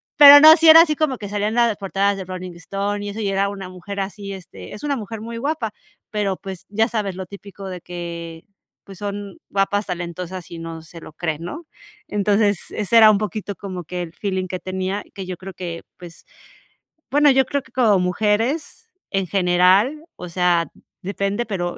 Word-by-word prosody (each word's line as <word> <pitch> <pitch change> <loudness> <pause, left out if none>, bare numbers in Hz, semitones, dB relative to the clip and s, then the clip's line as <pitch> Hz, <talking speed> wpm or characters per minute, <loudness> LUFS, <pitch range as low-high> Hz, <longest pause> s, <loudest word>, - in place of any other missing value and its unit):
pero 290 -2 +11
no, 315 +1 +10
sí 325 -1 +5
era 325 +1 +11
así 310 -3 +2
como 280 -5 0
que 205 - -7
salían 205 +1 -1
en 225 - -4
las 235 -2 +3
portadas 200 0 0
de 195 - -6
Rolling 185 -1 -7
Stone 200 +4 -3
y 205 - -4
eso, 205 - -6
y 210 - -1
era 195 +1 +1
una 195 -2 -7
mujer 185 +2 -8
así, 200 +1 -5
este, 165 - -10
es 210 - -10
una 285 -1 0
mujer 225 -1 -6
muy 230 +1 -6
guapa, 275 -4 -2 0.4
pero, 200 -3 -1
pues, 190 -3 -9
ya 220 +3 +2
sabes, 210 -5 -2
lo 190 - -6
típico 200 +1 -10
de 180 -2 -7
que, 170 -1 -7 0.4
pues, 195 -2 -12
son 205 -1 -5
guapas, 200 +1 0
talentosas 180 0 -5
y 170 - -7
no 165 -1 -7
se 165 +1 -13
lo - - -11
creen, 160 -1 -3
¿no? 305 - -7 0.4
Entonces 205 0 +2
ese 210 +2 -2
era 220 -1 +9
un 205 - +2
poquito 210 -1 -4
como 185 -3 -7
que 180 +2 -4
el 165 -1 -9
feeling 190 -1 -3
que 185 0 -5
tenía, 190 +2 -3
que 195 -1 -7
yo 185 0 -5
creo 190 +2 -10
que, 170 -2 -6 0.2
pues, 175 -2 -13 0.9
bueno, 290 +1 +5
yo 265 -1 +4
creo 280 -1 -2
que 260 - -21
como 220 -7 +3
mujeres 225 - -1 0.2
en 195 -2 -1
general, 190 - +3
o 180 - -7
sea, 175 -2 +2 0.3
depende, 200 +4 -2
pero, 175 -4 -3
200 Hz, 200 wpm, -21 LUFS, 180-215 Hz, 0.9 s, pero